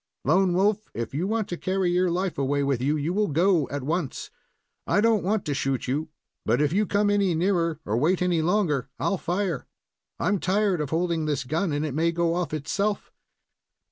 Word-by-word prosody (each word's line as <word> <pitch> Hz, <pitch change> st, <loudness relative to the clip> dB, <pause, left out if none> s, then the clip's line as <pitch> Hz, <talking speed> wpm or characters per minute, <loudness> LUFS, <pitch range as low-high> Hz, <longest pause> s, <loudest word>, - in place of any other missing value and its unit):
"Lone 180 Hz, +5 st, +3 dB
Wolf, 210 Hz, +3 st, +1 dB
if 115 Hz, 0 st, -4 dB
you 165 Hz, +7 st, -1 dB
want 220 Hz, 0 st, -1 dB
to 175 Hz, -, -3 dB
carry 185 Hz, -1 st, 0 dB
your 180 Hz, +1 st, +2 dB
life 180 Hz, -2 st, -2 dB
away 140 Hz, +1 st, +1 dB
with 140 Hz, -3 st, 0 dB
you, 145 Hz, +4 st, +1 dB
you 155 Hz, +4 st, -1 dB
will 210 Hz, +1 st, +1 dB
go 165 Hz, 0 st, +2 dB
at 140 Hz, -2 st, -4 dB
once. 160 Hz, 0 st, -3 dB, 0.6 s
I -, -, +3 dB
do 225 Hz, +1 st, +4 dB
n't 210 Hz, -, -2 dB
want 205 Hz, +2 st, 0 dB
to 145 Hz, -, -1 dB
shoot 135 Hz, -2 st, -1 dB
you, 150 Hz, +5 st, -1 dB, 0.3 s
but 115 Hz, +4 st, +1 dB
if 150 Hz, +1 st, +1 dB
you 205 Hz, +2 st, +2 dB
come 205 Hz, 0 st, +2 dB
any 200 Hz, -4 st, +2 dB
nearer 170 Hz, -2 st, +1 dB
or 105 Hz, -, -1 dB
wait 170 Hz, +8 st, +2 dB
any 175 Hz, -3 st, +1 dB
longer, 160 Hz, -7 st, +1 dB
I'll 195 Hz, -3 st, -1 dB
fire. 175 Hz, -4 st, -2 dB, 0.5 s
I'm 200 Hz, +2 st, +1 dB
tired 190 Hz, -2 st, +1 dB
of 150 Hz, -, -3 dB
holding 165 Hz, 0 st, 0 dB
this 145 Hz, -3 st, -1 dB
gun, 160 Hz, +7 st, -1 dB
and 145 Hz, +1 st, -1 dB
it 150 Hz, -, -3 dB
may 165 Hz, +3 st, +1 dB
go 170 Hz, 0 st, 0 dB
off 175 Hz, -1 st, -2 dB
itself." 195 Hz, +8 st, -2 dB
170 Hz, 205 wpm, -25 LUFS, 150-195 Hz, 0.6 s, do